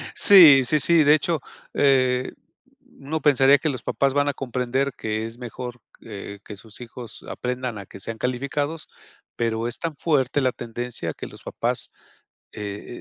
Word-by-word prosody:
Sí, 160 Hz, -10 st, +9 dB
sí, 150 Hz, +5 st, +1 dB
sí, 165 Hz, +2 st, +4 dB
de 145 Hz, +1 st, +6 dB
hecho, 155 Hz, -1 st, -1 dB, 0.3 s
eh, 130 Hz, -2 st, +2 dB, 0.7 s
uno 150 Hz, +3 st, -4 dB
pensaría 135 Hz, 0 st, +5 dB
que 155 Hz, +3 st, -1 dB
los 130 Hz, -5 st, -4 dB
papás 135 Hz, -1 st, 0 dB
van 145 Hz, 0 st, +1 dB
a 145 Hz, -, 0 dB
comprender 130 Hz, +1 st, -2 dB
que 110 Hz, 0 st, -3 dB
es 115 Hz, +1 st, -8 dB
mejor 125 Hz, 0 st, -8 dB, 0.2 s
que 100 Hz, -2 st, -9 dB
que 105 Hz, -, -8 dB
sus 110 Hz, +2 st, -14 dB
hijos 120 Hz, 0 st, -10 dB
aprendan 125 Hz, -2 st, -4 dB
a 100 Hz, -, -8 dB
que 100 Hz, -, -12 dB
sean 115 Hz, +3 st, -5 dB
calificados, 140 Hz, +6 st, -3 dB, 0.5 s
pero 115 Hz, 0 st, -1 dB
es 120 Hz, -, -5 dB
tan 165 Hz, -3 st, -4 dB
fuerte 145 Hz, -2 st, +1 dB
la 130 Hz, -1 st, +2 dB
tendencia 120 Hz, 0 st, -5 dB
que -, -, -8 dB
los -, -, -13 dB
papás, -, -, -3 dB, 0.6 s
eh 105 Hz, -1 st, -7 dB
130 Hz, 165 wpm, -23 LUFS, 115-145 Hz, 0.7 s, Sí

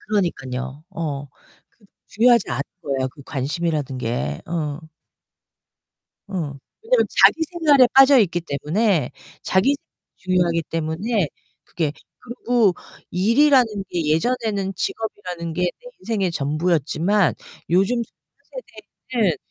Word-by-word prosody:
그러니깐요. 140 Hz, -9 st, -3 dB
어. 145 Hz, -4 st, -4 dB, 0.4 s
그도 210 Hz, -, -27 dB, 0.2 s
중요하지 235 Hz, -, +3 dB
않은 125 Hz, +3 st, -1 dB, 0.2 s
거예요 135 Hz, -2 st, -1 dB
그 140 Hz, +1 st, -15 dB
관심이라는 145 Hz, -1 st, -2 dB
게. 95 Hz, -, -3 dB
어. 155 Hz, -3 st, -3 dB, 1.5 s
어. 200 Hz, -, -8 dB, 0.5 s
왜냐면 460 Hz, +1 st, +3 dB, 0.2 s
자기 325 Hz, -, +6 dB
생활에 300 Hz, -7 st, +5 dB
빠져 270 Hz, 0 st, +8 dB
있기 175 Hz, -5 st, +2 dB
때문에, 165 Hz, +5 st, 0 dB, 0.3 s
자기생 260 Hz, +10 st, +2 dB, 0.4 s
중요하기 175 Hz, -3 st, +1 dB
때문에 165 Hz, +4 st, -1 dB, 0.4 s
그게 155 Hz, -4 st, -2 dB, 0.3 s
그리고 240 Hz, -4 st, +1 dB, 0.4 s
일이라는 250 Hz, +8 st, +4 dB, 0.3 s
게 170 Hz, -3 st, -2 dB
예전에는 200 Hz, +4 st, 0 dB
직업이라는 180 Hz, -5 st, -4 dB
게 175 Hz, +3 st, -2 dB
내 180 Hz, -, -3 dB
인생의 205 Hz, -, -1 dB
전부였지만 165 Hz, +5 st, +1 dB, 0.4 s
요즘 195 Hz, +7 st, +2 dB
젊은 -, -, -13 dB, 0.5 s
세대에는 215 Hz, -9 st, +2 dB
180 Hz, 270 characters per minute, -22 LUFS, 155-230 Hz, 1.5 s, 빠져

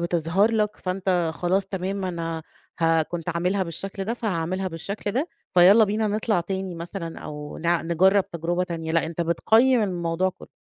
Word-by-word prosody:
بتظهر 170 Hz, +4 st, +2 dB
لك، 210 Hz, -1 st, 0 dB
فأنت 185 Hz, -2 st, 0 dB
خلاص 185 Hz, +4 st, 0 dB
تمام 195 Hz, 0 st, -3 dB
أنا 165 Hz, -2 st, -3 dB, 0.4 s
ه 165 Hz, -1 st, +3 dB
كنت 170 Hz, +1 st, -6 dB
عاملها 180 Hz, +3 st, 0 dB
بالشكل 195 Hz, +3 st, -5 dB
ده، 230 Hz, +3 st, -2 dB
فهاعملها 185 Hz, -4 st, -2 dB
بالشكل 200 Hz, +5 st, -4 dB
ده، 290 Hz, +8 st, 0 dB, 0.3 s
فيالّا 195 Hz, +5 st, +7 dB
بينا 215 Hz, +2 st, 0 dB
نطلع 210 Hz, -2 st, +1 dB
تاني 190 Hz, 0 st, -4 dB
مثلًا 170 Hz, 0 st, -6 dB
أو 150 Hz, 0 st, -7 dB
نع 170 Hz, 0 st, +1 dB
نجرّب 190 Hz, +4 st, +3 dB
تجربة 175 Hz, +2 st, -1 dB
تانية، 165 Hz, -2 st, -4 dB
لأ 165 Hz, -1 st, +2 dB
أنت 170 Hz, +1 st, -5 dB
بتقيِّم 220 Hz, +9 st, +3 dB
الموضوع 175 Hz, -1 st, 0 dB
كُلّه. -, -, -15 dB
180 Hz, 165 wpm, -24 LUFS, 165-195 Hz, 0.4 s, فيالّا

